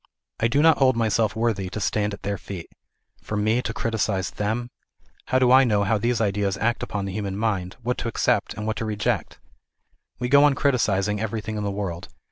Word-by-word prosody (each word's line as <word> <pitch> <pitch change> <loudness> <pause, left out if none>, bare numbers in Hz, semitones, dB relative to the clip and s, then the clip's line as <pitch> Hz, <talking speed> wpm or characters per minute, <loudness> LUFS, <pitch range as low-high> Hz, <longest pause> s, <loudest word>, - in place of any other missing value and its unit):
I 115 - +3
do 140 +6 +2
not 160 -1 +5
hold 130 -3 +4
myself 110 -1 +1
worthy 110 -5 0
to 90 - -5
stand 105 0 0
at - - -21
their 100 -1 -2
feet. 90 -2 -8 0.5
For 105 - -4
me 110 +4 +2
to - - -3
criticise 105 -4 -1
them! 115 +4 -2 0.5
How 130 - +1
do 125 -1 +4
I 130 +1 +8
know 105 -5 +2
how 105 +2 +1
these 120 +1 0
ideas 100 -2 0
act 120 +2 0
upon 100 -1 -3
the 95 - -5
human 100 -1 -3
mind, 100 -4 -1
what 125 +2 -1
to - - -3
accept 115 -2 0
and 105 - -5
what 110 -1 -2
to 115 - -3
reject? 105 -1 -2 0.8
We^go 130 +4 +4
on 145 -1 +5
criticising 105 -8 +1
everything 110 0 -3
in 105 - -3
the 100 - -1
world. 95 -3 -4
110 Hz, 205 wpm, -24 LUFS, 100-120 Hz, 0.8 s, I